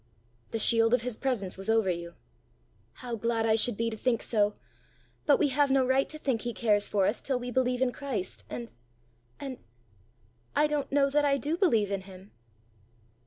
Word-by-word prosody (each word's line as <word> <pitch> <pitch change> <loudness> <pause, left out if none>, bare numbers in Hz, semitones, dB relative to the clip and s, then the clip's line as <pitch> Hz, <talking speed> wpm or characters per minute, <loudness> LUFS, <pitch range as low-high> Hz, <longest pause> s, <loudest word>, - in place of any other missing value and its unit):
"The - - -3
shield 225 +1 +5
of 240 - -4
his 250 -2 -3
presence 220 -8 -2
was 195 +2 -5
over 225 -4 +3
you." 170 0 -6 0.9
"How 240 -1 -3
glad 230 0 -1
I 220 - +3
should 225 0 +4
be 230 0 -1
to - - -4
think 235 +1 0
so! 210 -2 +1 0.7
But 290 - +6
we 295 - +2
have 285 +1 +2
no 265 -1 +3
right 260 +2 +2
to 310 - -5
think 265 -7 -1
he 240 -1 -4
cares 210 -3 +1
for 200 -2 +2
us 210 - -1
till 265 -2 -1
we 245 0 -5
believe 250 0 +1
in 255 - +1
Christ 250 -9 -5
and 235 -1 -6 0.7
and 270 -3 -6 1.0
I 300 - +4
don't 295 -2 -2
know 275 0 +2
that 295 +1 +2
I 280 -1 +3
do 295 +4 -2
believe 230 - +2
in 195 -1 -2
him!" 190 +1 -14
240 Hz, 195 wpm, -28 LUFS, 215-270 Hz, 1.0 s, But